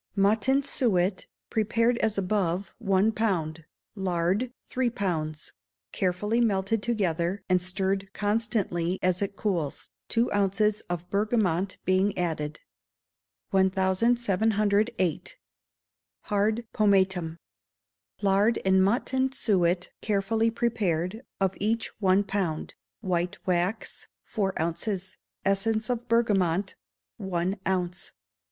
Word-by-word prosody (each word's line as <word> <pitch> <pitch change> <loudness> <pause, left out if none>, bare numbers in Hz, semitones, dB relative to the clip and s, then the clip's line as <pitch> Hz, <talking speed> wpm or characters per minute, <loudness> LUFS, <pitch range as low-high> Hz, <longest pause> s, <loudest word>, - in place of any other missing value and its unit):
Mutton 215 +7 +3
suet, 200 -9 0 0.2
prepared 230 +2 +2
as 220 -2 0
above, 190 -1 0
one 200 -1 +3
pound; 170 -8 -1 0.3
lard, 190 +4 0
three 255 -1 0
pounds; 160 -9 -3 0.4
carefully 205 +5 0
melted 200 -1 +1
together, 190 -5 -1
and 185 -1 +3
stirred 190 +1 -1
constantly 205 -5 0
as 185 0 +2
it 200 0 -2
cools, 175 -10 -2 0.2
two 235 +1 +1
ounces 205 +1 +2
of 175 0 -3
bergamot 200 -3 +1
being 190 +2 +2
added. 155 -3 -2 0.9
1708. 200 - +1 0.8
Hard 215 +3 0
Pomatum. 190 -5 +2 0.9
Lard 200 +3 +3
and 190 0 +5
mutton 260 +5 +1
suet 185 -8 +1
carefully 220 +2 +1
prepared, 215 -5 -1 0.2
of 195 -1 +1
each 225 +3 0
one 190 +1 +4
pound; 190 -6 -2 0.3
white 180 -3 -1
wax, 180 +4 -1 0.2
four 195 -3 -2
ounces; 185 +3 -3 0.3
essence 215 +4 +1
of 245 0 -3
bergamot, 195 -5 +2 0.4
one 190 -1 -2
ounce. 180 -1 -2
195 Hz, 100 wpm, -27 LUFS, 180-220 Hz, 0.9 s, and